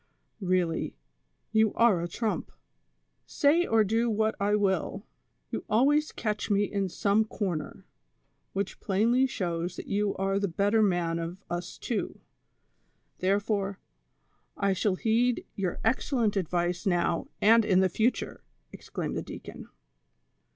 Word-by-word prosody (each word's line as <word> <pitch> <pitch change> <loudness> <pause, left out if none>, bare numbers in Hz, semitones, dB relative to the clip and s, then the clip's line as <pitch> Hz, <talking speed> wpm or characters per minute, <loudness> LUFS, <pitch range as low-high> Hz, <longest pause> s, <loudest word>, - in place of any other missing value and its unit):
" - - -39
Eeally, 180 -3 0 0.6
you 220 -1 +3
are 225 -7 +4
a 170 - -2
trump; 220 +5 -3 0.8
say 330 +4 +3
or 225 -1 +4
do 225 +3 +1
what 220 0 +1
I 205 +1 +2
will, 195 0 0 0.5
you - - -3
al 225 +5 +4
ways 300 +2 +2
catch 215 -1 -3
me 205 0 +3
in 200 -2 -1
some 205 +4 +2
corner, 185 -8 -4 0.7
which 195 0 -3
plainly 230 +7 +2
shows 175 -6 -3
that - - -7
you 205 0 0
are 195 +1 0
the 200 - 0
better 200 +5 +2
man 175 -4 +1
of 170 +2 -4
us 175 0 -4
two; 235 - -3 1.0
therefore, 200 +1 0 0.8
I 200 -1 +2
shall 190 +1 +1
heed 230 +4 +1
your 185 -3 -3
excellent 230 -2 +1
advice 175 0 -1
now 175 -2 +1
and 225 +2 +6
in 190 -3 +3
the 190 - +4
future," 220 +7 -1 0.3
exclaimed - - -5
the - - -1
deacon. - - -9
200 Hz, 135 wpm, -28 LUFS, 185-220 Hz, 1.0 s, and